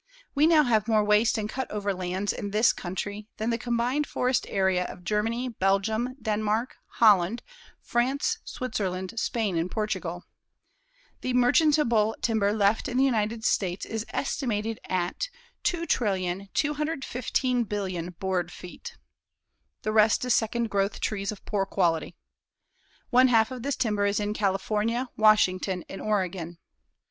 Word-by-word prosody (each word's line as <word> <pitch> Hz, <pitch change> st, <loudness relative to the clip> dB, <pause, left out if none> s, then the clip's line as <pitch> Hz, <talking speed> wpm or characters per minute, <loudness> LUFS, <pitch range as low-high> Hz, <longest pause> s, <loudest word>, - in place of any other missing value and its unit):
We 295 Hz, +2 st, +4 dB
now 320 Hz, -2 st, +6 dB
have 220 Hz, -4 st, +2 dB
more 215 Hz, -2 st, +3 dB
waste 210 Hz, +3 st, +3 dB
and 210 Hz, -1 st, -2 dB
cut 260 Hz, +4 st, -4 dB
over 205 Hz, -1 st, -2 dB
lands 185 Hz, +2 st, -2 dB
in 205 Hz, -, -5 dB
this 215 Hz, +4 st, +4 dB
country 205 Hz, +3 st, -5 dB
than 220 Hz, +2 st, -1 dB
the 230 Hz, -, 0 dB
combined 245 Hz, +4 st, 0 dB
forest 250 Hz, 0 st, 0 dB
area 190 Hz, -2 st, +2 dB
of 180 Hz, -, -9 dB
Germany, 225 Hz, +6 st, -1 dB
Belgium, 220 Hz, +4 st, 0 dB
Denmark, 215 Hz, +2 st, -1 dB, 0.2 s
Holland, 210 Hz, -1 st, +4 dB, 0.4 s
France, 275 Hz, -, 0 dB
Switzerland, 190 Hz, -7 st, -3 dB
Spain 220 Hz, -7 st, -1 dB
and 165 Hz, +2 st, 0 dB
Portugal. 185 Hz, -5 st, -3 dB, 1.0 s
The 255 Hz, -1 st, -1 dB
merchantable 250 Hz, -4 st, +3 dB
timber 220 Hz, -3 st, +1 dB
left 210 Hz, +2 st, +2 dB
in 250 Hz, -2 st, -2 dB
the 265 Hz, -, +4 dB
United 225 Hz, -3 st, 0 dB
States 185 Hz, -1 st, 0 dB
is 225 Hz, -1 st, -3 dB
estimated 225 Hz, -6 st, -2 dB
at 185 Hz, -, -2 dB, 0.4 s
2,215,000,000,000 225 Hz, -, -1 dB
board 185 Hz, -2 st, -1 dB
feet. 470 Hz, -, -10 dB, 0.9 s
The 215 Hz, -, 0 dB
rest 215 Hz, +2 st, +4 dB
is 250 Hz, -, +3 dB
second 230 Hz, 0 st, 0 dB
growth 200 Hz, 0 st, 0 dB
trees 200 Hz, -2 st, -2 dB
of 210 Hz, -, -11 dB
poor 195 Hz, -2 st, -1 dB
quality. 170 Hz, -3 st, 0 dB, 1.0 s
One 255 Hz, +1 st, +6 dB
half 225 Hz, -1 st, +3 dB
of 255 Hz, -2 st, -6 dB
this 280 Hz, +2 st, -1 dB
timber 210 Hz, -4 st, +1 dB
is 200 Hz, +1 st, 0 dB
in 210 Hz, 0 st, -1 dB
California, 215 Hz, +5 st, 0 dB
Washington 190 Hz, -4 st, +3 dB
and 195 Hz, -, -8 dB
Oregon. 185 Hz, -5 st, -2 dB
215 Hz, 135 wpm, -27 LUFS, 195-245 Hz, 1.0 s, now